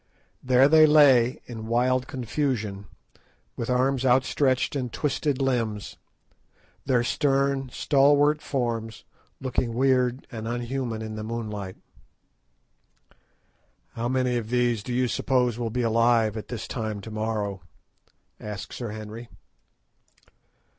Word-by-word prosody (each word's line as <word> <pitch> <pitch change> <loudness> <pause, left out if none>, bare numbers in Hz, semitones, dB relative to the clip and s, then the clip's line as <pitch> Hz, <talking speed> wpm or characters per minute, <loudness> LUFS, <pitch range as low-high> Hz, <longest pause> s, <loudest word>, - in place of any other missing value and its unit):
There 130 +1 +5
they 155 +1 +7
lay 135 -5 +5
in 110 -2 -8
wild 125 +2 +1
confusion, 115 -6 -3 0.7
with 115 - -4
arms 130 +1 +1
outstretched 130 +1 +2
and 125 -4 -3
twisted 145 0 -1
limbs; 115 -6 -1 0.9
their 125 -2 +3
stern, 135 0 0
stalwart 145 +3 +3
forms 115 -4 -3 0.4
looking 125 -3 -2
weird 130 0 +1
and 110 -1 -6
unhuman 120 -1 -3
in 110 0 -6
the 105 - -5
moonlight. 105 -4 -5 2.1
"How 120 +1 -3
many 130 -1 +1
of 110 -2 -4
these 120 -3 +1
do 125 - -7
you 125 +1 +1
suppose 125 -1 0
will 115 -1 -2
be 125 +2 -2
alive 115 -1 +3
at 105 -2 -6
this 120 -2 -6
time 110 -3 -4
to 110 - -9
morrow?" 110 -3 -3 0.8
asked 105 -2 -7
Sir 120 -3 -5
Henry. 110 +2 -8
120 Hz, 120 wpm, -25 LUFS, 110-130 Hz, 2.1 s, they